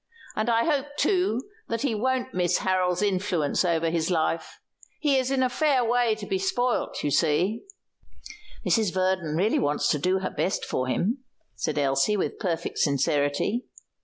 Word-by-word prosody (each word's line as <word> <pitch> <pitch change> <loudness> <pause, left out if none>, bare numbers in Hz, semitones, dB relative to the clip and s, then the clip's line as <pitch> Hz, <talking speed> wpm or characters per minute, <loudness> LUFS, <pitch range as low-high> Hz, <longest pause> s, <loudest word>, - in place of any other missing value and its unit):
"And 215 +2 0
I 230 0 +3
hope, 290 -2 -1
too, 360 - +1 0.3
that 230 +1 -2
he 275 -5 +1
won't 260 +4 -1
miss 180 -1 +2
Harold's 185 0 +1
influence 185 -7 0
over 165 -2 +1
his 165 0 0
life. 165 -1 -1 0.4
He's 270 -4 +2
in 265 -1 +1
a - - +3
fair 265 -1 +2
way 240 -1 +2
to 215 -1 -8
be 190 -1 -1
spoilt, 245 +6 -1
you 145 - 0
see." 170 - +1 1.0
"Mrs. 220 -5 +2
Verdon 185 -4 0
really 195 +7 +2
wants 145 +1 +1
to 150 - +1
do 185 +5 +1
her 190 0 -3
best 190 - -1
for 130 - -2
him," 225 - -1 0.3
said 155 - -3
Elsie, 140 +8 +2
with - - -2
perfect 170 -5 -2
sincerity. 145 - +1
190 Hz, 160 wpm, -26 LUFS, 165-245 Hz, 1.0 s, I